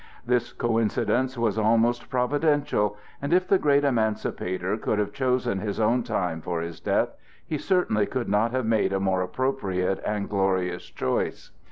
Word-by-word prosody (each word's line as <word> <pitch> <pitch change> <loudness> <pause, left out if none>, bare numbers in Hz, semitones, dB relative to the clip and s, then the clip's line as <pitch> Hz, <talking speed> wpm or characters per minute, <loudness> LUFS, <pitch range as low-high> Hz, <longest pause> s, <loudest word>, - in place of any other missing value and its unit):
This 120 0 +1
coincidence 115 +2 0
was 110 -2 +1
almost 115 +2 +2
providential, 135 -5 +1 0.2
and 140 - -3
if 185 +1 +3
the 195 - +4
great 145 -1 +3
Emancipator 110 -6 0
could 110 -1 -1
have 105 -1 -1
chosen 125 -7 0
his 100 +1 -3
own 115 +3 +3
time 90 -9 -2
for 85 +2 -2
his 85 0 -5
death, - - +1 0.4
he 155 - -3
certainly 155 - +1
could 130 -2 -3
not 105 +3 +2
have 130 0 -1
made 110 -3 +2
a 95 - +1
more 95 -1 +1
appropriate 95 -4 -1
and 105 -1 -2
glorious 95 -3 0
choice. 65 - -2
110 Hz, 160 wpm, -26 LUFS, 100-130 Hz, 0.4 s, the